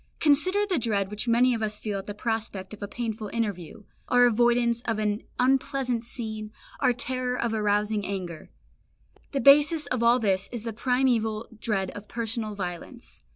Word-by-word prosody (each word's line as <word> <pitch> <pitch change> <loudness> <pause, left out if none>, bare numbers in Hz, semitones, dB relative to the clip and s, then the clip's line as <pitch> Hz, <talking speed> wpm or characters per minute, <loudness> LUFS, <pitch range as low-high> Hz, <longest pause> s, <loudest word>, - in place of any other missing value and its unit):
Consider 370 +8 +3
the 370 -7 0
dread 205 -4 -1
which 210 +3 -4
many 245 +2 +4
of 225 - -3
us 210 -1 -1
feel 205 -2 -3
at 195 - -10
the 205 - -5
prospect 215 -4 -3
of 210 - -11
a 205 - -3
painful 220 -1 -4
interview, 210 -3 -4 0.2
our 245 0 +5
avoidance 240 0 +3
of 225 -2 -2
an 210 0 -1 0.2
unpleasant 260 -2 +1
scene, 220 -3 -5 0.3
our 255 -3 +3
terror 250 +1 -1
of 235 -1 -1
arousing 210 0 +1
anger. 180 -5 -5 0.8
The 275 - -1
basis 295 +3 +6
of 255 -2 -2
all 235 +1 +5
this 195 -4 0
is 240 -3 -5
the 230 -1 -4
primeval 230 -2 +1
dread 195 -5 -1
of 205 0 -10
personal 225 -2 -3
violence. 185 +6 -7
225 Hz, 170 wpm, -26 LUFS, 210-250 Hz, 0.8 s, basis